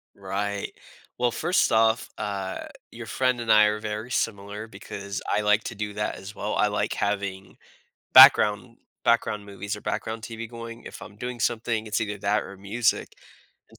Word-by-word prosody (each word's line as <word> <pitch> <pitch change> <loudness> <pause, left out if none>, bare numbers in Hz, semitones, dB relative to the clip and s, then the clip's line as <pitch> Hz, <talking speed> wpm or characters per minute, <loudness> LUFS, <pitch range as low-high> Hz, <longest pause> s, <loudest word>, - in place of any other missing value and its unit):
Right. 100 +1 -3 0.4
Well, 120 -1 +1
first 175 +8 +1
off, 110 +1 +3
uh, 100 -3 -4 0.3
your 120 0 -8
friend 130 0 +1
and 115 -1 0
I 105 0 +7
are 105 0 +1
very 110 +3 -5
similar 105 +1 -2
because 100 -1 -7
I 105 - +2
like 105 0 +3
to 115 - -5
do 105 0 -4
that 105 +1 -2
as 100 +2 -10
well, 105 - -3
I 105 - +3
like 105 0 -1
having 100 -1 -3 0.6
background 110 +3 +8 0.3
background 105 -3 +1
movies, 100 +1 -5
or - - -10
background 110 0 -3
TV 115 -1 -6
going, 115 0 -8
if - - -10
I'm 100 - -11
doing 125 +2 -5
something, 115 -1 -1
it's 105 - -1
either 105 -2 -3
that 105 +2 +1
or 100 - -10
music. 105 +4 -1 0.5
And - - -20
105 Hz, 175 wpm, -26 LUFS, 100-115 Hz, 0.6 s, background